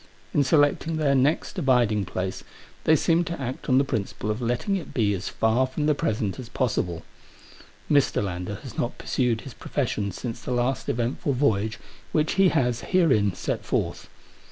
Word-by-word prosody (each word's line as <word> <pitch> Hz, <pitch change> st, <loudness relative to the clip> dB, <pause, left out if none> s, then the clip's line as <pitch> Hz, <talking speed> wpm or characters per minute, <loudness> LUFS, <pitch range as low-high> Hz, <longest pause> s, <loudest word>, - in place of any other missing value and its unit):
In 145 Hz, -, +4 dB
selecting 145 Hz, +3 st, +2 dB
their 145 Hz, -3 st, +2 dB
next 140 Hz, +7 st, +1 dB
abiding 120 Hz, -, +2 dB
place, 95 Hz, +1 st, -4 dB, 0.4 s
they 160 Hz, -, +6 dB
seem 165 Hz, +3 st, +3 dB
to 170 Hz, -2 st, -4 dB
act 130 Hz, -1 st, -5 dB
on 130 Hz, -, +5 dB
the 135 Hz, -, +5 dB
principle 110 Hz, -4 st, -2 dB
of 110 Hz, +3 st, -3 dB
letting 120 Hz, -, 0 dB
it 185 Hz, -, -6 dB
be 105 Hz, -4 st, +2 dB
as 95 Hz, 0 st, -3 dB
far 115 Hz, +4 st, +2 dB
from 150 Hz, +3 st, -2 dB
the 150 Hz, -, +4 dB
present 110 Hz, -5 st, -1 dB
as 120 Hz, -3 st, -8 dB
possible. 90 Hz, -11 st, -1 dB, 0.8 s
Mr. 140 Hz, -7 st, +3 dB
Lander 90 Hz, +1 st, -4 dB
has 130 Hz, -5 st, -9 dB
not 120 Hz, -, -2 dB
pursued 120 Hz, -4 st, 0 dB
his 135 Hz, -, -9 dB
profession 105 Hz, -7 st, -2 dB
since 115 Hz, +4 st, -6 dB
the -, -, -7 dB
last 120 Hz, 0 st, 0 dB
eventful 120 Hz, +4 st, -1 dB
voyage 110 Hz, -5 st, +1 dB, 0.4 s
which 155 Hz, -1 st, +2 dB
he 195 Hz, -1 st, +5 dB
has 125 Hz, -7 st, +1 dB
herein 120 Hz, -, +2 dB
set -, -, -3 dB
forth. -, -, -2 dB
125 Hz, 175 wpm, -25 LUFS, 110-145 Hz, 0.8 s, they